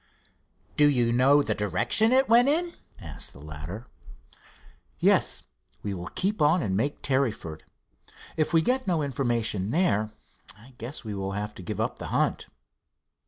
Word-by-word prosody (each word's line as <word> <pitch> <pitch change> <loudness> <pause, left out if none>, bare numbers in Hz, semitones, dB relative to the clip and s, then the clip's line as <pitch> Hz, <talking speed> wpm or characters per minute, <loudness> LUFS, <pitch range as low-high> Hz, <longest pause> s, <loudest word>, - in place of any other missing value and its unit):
"Do 150 0 +6
you 120 -4 +2
know 135 +4 +5
the - - 0
direction 120 - +2
it 265 +1 +4
went 240 +3 +5
in?" 340 +3 0 0.3
asked 80 -8 -6
the - - -14
latter. 75 - -8 1.1
"Yes. - - +2 0.4
We 100 - -3
will 90 -1 -6
keep 195 0 -2
on 155 +4 +4
and 95 -2 -1
make 140 +8 -2
Tarryford. 120 - -1 0.7
If 155 -1 0
we 165 -1 +4
get 255 +3 0
no 170 -5 +1
information 115 -7 -1
there, 110 - +1 0.5
I 120 +5 -17
guess 125 +7 -6
we 105 - -4
will 95 0 -4
have 105 +1 -4
to - - -11
give 85 - -5
up - - -2
the - - -5
hunt." - - 0
125 Hz, 160 wpm, -27 LUFS, 105-160 Hz, 1.1 s, Do